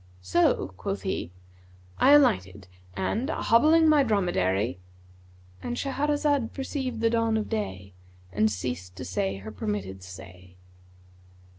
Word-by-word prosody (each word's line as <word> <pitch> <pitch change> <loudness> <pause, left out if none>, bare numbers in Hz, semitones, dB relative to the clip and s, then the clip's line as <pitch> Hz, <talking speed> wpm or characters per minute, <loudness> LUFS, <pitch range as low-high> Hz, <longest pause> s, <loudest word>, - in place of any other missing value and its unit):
So 90 - +2
(quoth - - -4
he) 85 - -3 0.7
"I 280 - +6
alighted 95 - +3 0.3
and, 210 - -1
hobbling 315 +4 +4
my 305 -2 +5
dromedary,"—And 90 - -3
Shahrazad 285 -2 0
perceived 265 -4 -4
the 230 0 +2
dawn 230 -1 +1
of 215 - -3
day 95 - -4 0.4
and 110 +3 +2
ceased 90 -3 -5
to - - -7
say 95 +2 -2
her 105 +3 -8
permitted 95 -2 -4
say. 90 0 -12
105 Hz, 115 wpm, -27 LUFS, -, 0.7 s, I